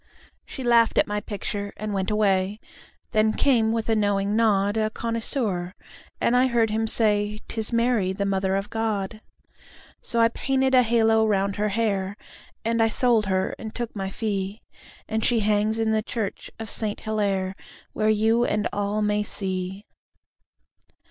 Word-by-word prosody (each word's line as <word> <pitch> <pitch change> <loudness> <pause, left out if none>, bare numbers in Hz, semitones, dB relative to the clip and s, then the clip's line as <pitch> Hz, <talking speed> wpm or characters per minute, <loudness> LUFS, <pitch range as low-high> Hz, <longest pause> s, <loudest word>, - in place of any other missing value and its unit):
She 265 - -7
laughed 235 -2 +4
at - - +5
my 210 0 -2
picture 205 -1 -4
and 215 -1 -4
went 190 -1 -1
away. 200 -1 +1 0.5
Then 215 -1 +3
came, 230 -5 +3
with 225 -1 -1
a 225 - +2
knowing 205 -1 +1
nod, 205 -2 +2
A 215 -1 +1
connoisseur, 220 -5 -3 0.4
and 240 - +2
I 255 +1 +4
heard 230 -3 +1
him 225 +1 0
say; 210 -2 +1
"'Tis 220 0 -2
Mary, 230 -5 +2
the 200 +1 -2
Mother 190 -1 0
of 195 +1 -3
God." 215 -2 -2 0.8
So 235 - -1
I 230 0 +5
painted 265 +2 0
a 255 - +7
halo 225 -2 +3
round 200 -1 0
her 210 +1 0
hair, 200 -2 -1 0.5
And 230 0 +1
I 225 - +5
sold 225 -2 +2
her 190 0 0
and 220 -1 -7
took 240 -2 -4
my 195 -1 -3
fee, 200 0 -3 0.4
And 220 0 -1
she 235 -2 +3
hangs 210 +1 +1
in 225 -1 +1
the 220 0 +2
church 215 -2 -4
of 225 - -6
Saint 210 0 -2
Hillaire, 200 -3 -1 0.4
Where 215 0 +1
you 220 +2 +3
and 210 -3 0
all 205 +1 -1
may 210 0 +1
see. 190 -1 -3
215 Hz, 165 wpm, -24 LUFS, 200-225 Hz, 0.8 s, a